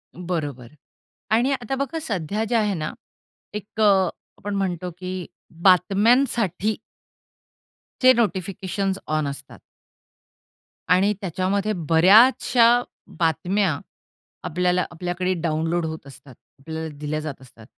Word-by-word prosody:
बरोबर. 155 Hz, -8 st, -4 dB, 0.6 s
आणि 240 Hz, +5 st, +3 dB
आता 265 Hz, -1 st, -2 dB
बघा 280 Hz, +4 st, -3 dB
सध्या 205 Hz, -, -2 dB
जे 240 Hz, -, +1 dB
आहे 210 Hz, -3 st, +2 dB
ना, 155 Hz, -4 st, -4 dB, 0.6 s
एक 210 Hz, +1 st, -8 dB
अ, -, -, +5 dB, 0.5 s
आपण 205 Hz, 0 st, -5 dB
म्हणतो 180 Hz, -2 st, -2 dB
की 185 Hz, -1 st, -5 dB, 0.4 s
बातम्यांसाठी 205 Hz, +1 st, +3 dB, 1.3 s
चे 255 Hz, 0 st, +8 dB
नोटिफिकेशन्स 195 Hz, -3 st, -1 dB
ऑन 155 Hz, -1 st, 0 dB
असतात. 140 Hz, 0 st, -8 dB, 1.3 s
आणि 190 Hz, +4 st, +4 dB
त्याच्यामध्ये 195 Hz, +3 st, -1 dB, 0.2 s
बऱ्याचशा 230 Hz, +7 st, +6 dB, 0.4 s
बातम्या 170 Hz, +1 st, +1 dB, 0.7 s
आपल्याला 180 Hz, +1 st, +1 dB
आपल्याकडे 180 Hz, +2 st, -2 dB
डाउनलोड 165 Hz, +1 st, 0 dB
होत 160 Hz, -3 st, -6 dB
असतात. 135 Hz, -1 st, -14 dB, 0.2 s
आपल्याला 160 Hz, +3 st, -6 dB
दिल्या 150 Hz, +1 st, -3 dB
जात 150 Hz, -4 st, -6 dB
असतात. 120 Hz, -3 st, -16 dB
185 Hz, 105 wpm, -23 LUFS, 160-210 Hz, 1.3 s, चे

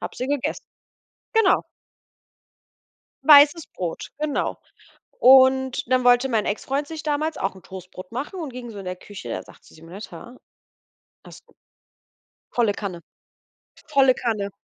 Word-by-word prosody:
Habe -, -, -7 dB
sie 255 Hz, -, -3 dB
gegessen 285 Hz, -1 st, -2 dB, 0.7 s
Genau. 445 Hz, -4 st, +3 dB, 1.6 s
Weißes 295 Hz, +2 st, +7 dB
Brot, 175 Hz, -3 st, -6 dB
genau. 305 Hz, -1 st, -2 dB, 0.6 s
Und 260 Hz, -, +5 dB
dann 255 Hz, -1 st, +2 dB
wollte 245 Hz, +2 st, +4 dB
mein 225 Hz, -4 st, 0 dB
Exfreund 270 Hz, +7 st, -2 dB
sich 315 Hz, 0 st, -7 dB
damals 305 Hz, +1 st, -2 dB
auch 195 Hz, -, -2 dB
'n 190 Hz, -, -15 dB
Toastbrot 185 Hz, +1 st, -11 dB
machen 290 Hz, -, -5 dB
und 310 Hz, -4 st, -5 dB
ging 245 Hz, -1 st, -8 dB
so 210 Hz, -, -9 dB
in 195 Hz, -, -8 dB
der 180 Hz, 0 st, -5 dB
Küche. 205 Hz, +2 st, -10 dB
Er -, -, -4 dB
sagte: -, -, -19 dB
„Simonetta 175 Hz, +7 st, -11 dB, 0.9 s
hast -, -, -14 dB
du -, -, -23 dB, 1.0 s
Volle 230 Hz, -4 st, +2 dB
Kanne, 190 Hz, -5 st, -6 dB, 0.9 s
volle 270 Hz, -4 st, +4 dB
Kanne. 215 Hz, -5 st, -2 dB
250 Hz, 135 wpm, -23 LUFS, 200-285 Hz, 1.6 s, Weißes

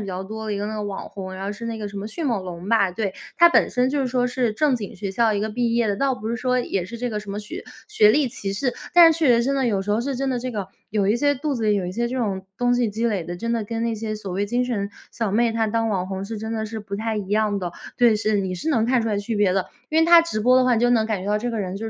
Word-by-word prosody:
比 205 Hz, -, -5 dB
较 190 Hz, 0 st, -4 dB
多 220 Hz, +2 st, -6 dB
的 215 Hz, -, -2 dB
一 -, -, -3 dB
个 205 Hz, -, -2 dB
那 215 Hz, -, -4 dB
个 210 Hz, -, -3 dB
网 200 Hz, -1 st, -5 dB
红， 190 Hz, -1 st, -7 dB
然 190 Hz, +1 st, -6 dB
后 200 Hz, -, -2 dB
是 230 Hz, +3 st, -7 dB
那 230 Hz, -1 st, -3 dB
个 210 Hz, -, -4 dB
什 200 Hz, 0 st, -7 dB
么 205 Hz, -, -5 dB
迅 305 Hz, +9 st, -5 dB
猛 225 Hz, -7 st, 0 dB
龙 180 Hz, +1 st, -7 dB
吧， 200 Hz, -5 st, +4 dB
对。 195 Hz, 0 st, -2 dB, 0.2 s
她 340 Hz, 0 st, +8 dB
本 -, -, +4 dB
身 250 Hz, +1 st, +1 dB
就 290 Hz, 0 st, 0 dB
是 265 Hz, -, 0 dB
说 250 Hz, 0 st, +1 dB
是 250 Hz, -2 st, 0 dB
正 285 Hz, +2 st, +2 dB
经 205 Hz, -5 st, -7 dB
学 195 Hz, +1 st, -4 dB
校 225 Hz, +2 st, +2 dB
一 200 Hz, -, 0 dB
个 215 Hz, +1 st, -2 dB
毕 235 Hz, +1 st, 0 dB
业 235 Hz, -2 st, +2 dB
的， 205 Hz, -, +1 dB
倒 275 Hz, +1 st, +1 dB
不 220 Hz, -2 st, -6 dB
是 235 Hz, -, -1 dB
说， 250 Hz, +2 st, 0 dB
也 195 Hz, -7 st, -1 dB
是 235 Hz, +3 st, -7 dB
这 245 Hz, 0 st, -3 dB
个 210 Hz, -1 st, -3 dB
什 205 Hz, -, -9 dB
么 200 Hz, -, -4 dB
学 215 Hz, -, -7 dB, 0.2 s
学 425 Hz, 0 st, +4 dB
历 295 Hz, -2 st, +3 dB
歧 200 Hz, -4 st, -4 dB
视， 250 Hz, +4 st, 0 dB, 0.2 s
但 335 Hz, -2 st, +9 dB
是 315 Hz, -, -5 dB
确 315 Hz, -4 st, +3 dB
实 235 Hz, -, +1 dB
真 275 Hz, -, +1 dB
的， 270 Hz, -2 st, +1 dB
有 200 Hz, -4 st, 0 dB
时 205 Hz, -, -4 dB
候 210 Hz, +2 st, +2 dB
是 270 Hz, +2 st, -2 dB
真 270 Hz, +1 st, -1 dB
的 250 Hz, -, -1 dB
这 255 Hz, +1 st, -4 dB
个 205 Hz, -5 st, -4 dB, 0.2 s
有 205 Hz, -2 st, +1 dB
一 210 Hz, -, +3 dB
些 285 Hz, +3 st, +2 dB
肚 290 Hz, +3 st, -2 dB
子 230 Hz, -3 st, -2 dB
里 210 Hz, -1 st, +3 dB
有 195 Hz, -3 st, 0 dB
一 180 Hz, -, -4 dB
些 235 Hz, +4 st, -1 dB
这 255 Hz, -, -4 dB
种 195 Hz, -6 st, -2 dB
东 245 Hz, 0 st, +2 dB
西 245 Hz, -2 st, +1 dB
积 225 Hz, +3 st, -1 dB
累 200 Hz, -6 st, 0 dB
的， 175 Hz, +1 st, -5 dB
真 230 Hz, +4 st, -2 dB
的 230 Hz, -2 st, 0 dB
跟 225 Hz, +2 st, -3 dB
那 230 Hz, -1 st, 0 dB
些 215 Hz, 0 st, -4 dB
所 200 Hz, -3 st, -6 dB
谓 200 Hz, +2 st, -1 dB
精 245 Hz, +3 st, 0 dB
神 205 Hz, -5 st, -2 dB, 0.2 s
小 225 Hz, -4 st, -2 dB
妹 230 Hz, +3 st, +2 dB
她 225 Hz, 0 st, +1 dB
当 225 Hz, +1 st, 0 dB
网 185 Hz, -4 st, -1 dB
红 190 Hz, 0 st, -4 dB
是 220 Hz, +1 st, -5 dB
真 220 Hz, +1 st, -4 dB
的 220 Hz, -1 st, -2 dB
是 220 Hz, 0 st, -6 dB
不 200 Hz, -1 st, -6 dB
太 220 Hz, +1 st, -2 dB
一 205 Hz, -2 st, -3 dB
样 210 Hz, -1 st, +1 dB
的。 175 Hz, -2 st, -4 dB, 0.2 s
对， 240 Hz, -2 st, +5 dB
是， 215 Hz, 0 st, +1 dB
你 190 Hz, -1 st, -3 dB
是 180 Hz, -, -4 dB
能 225 Hz, -6 st, +2 dB
看 250 Hz, -1 st, +2 dB
出 225 Hz, -, -1 dB
来 210 Hz, -, 0 dB
区 210 Hz, +3 st, -3 dB
别 205 Hz, -3 st, +3 dB
的， 190 Hz, -1 st, 0 dB, 0.2 s
因 315 Hz, -, +2 dB
为 -, -, +5 dB
她 340 Hz, 0 st, +9 dB
直 330 Hz, -10 st, -3 dB
播 250 Hz, +4 st, +5 dB
的 255 Hz, -, +5 dB
话， 250 Hz, -1 st, +4 dB
你 225 Hz, -, +1 dB
就 245 Hz, -, +4 dB
能 230 Hz, -3 st, +3 dB
感 215 Hz, -4 st, -1 dB
觉 -, -, -6 dB
到 210 Hz, -, +2 dB
这 240 Hz, +3 st, -2 dB
个 230 Hz, -, -3 dB
人 190 Hz, -1 st, -3 dB
就 225 Hz, +2 st, -4 dB
220 Hz, 370 characters per minute, -23 LUFS, 200-245 Hz, 0.2 s, 但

